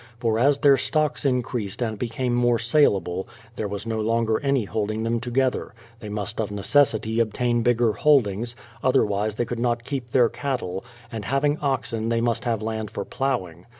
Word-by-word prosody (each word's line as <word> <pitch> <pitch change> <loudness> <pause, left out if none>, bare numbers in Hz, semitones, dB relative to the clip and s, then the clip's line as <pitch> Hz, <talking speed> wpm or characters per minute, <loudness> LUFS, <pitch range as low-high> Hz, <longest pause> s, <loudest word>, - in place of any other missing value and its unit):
For 115 -2 0
as 140 +3 +4
their 140 -1 +5
stocks 150 0 0
increased 120 -5 -1
and 110 -4 -2
became 125 +1 -2
more 120 -1 +3
saleable, 100 - +2 0.3
there 110 - -2
was 100 +1 -5
no 110 -1 -2
longer 115 0 +1
any 140 -5 +1
holding 110 +1 -2
them 115 +1 0
to 120 +1 -6
gether; 130 -2 0 0.2
they 105 - -8
must 105 +1 -3
of 105 - -3
necessity 110 +1 +2
obtain 120 +1 +1
bigger 120 -1 +2
holdings, 120 -5 +2 0.3
otherwise 105 -5 +2
they 120 - -1
could 120 0 -4
not 120 -1 0
keep 130 -2 -4
their 120 0 +4
cattle; 115 -10 -3 0.3
and 110 -3 -5
having 145 +4 +1
oxen 125 -5 -1
they 115 0 +1
must 115 +1 0
have 115 -3 -1
land 110 -1 -3
for 100 - -5
ploughing. 95 -11 -3
115 Hz, 180 wpm, -24 LUFS, 110-125 Hz, 0.3 s, their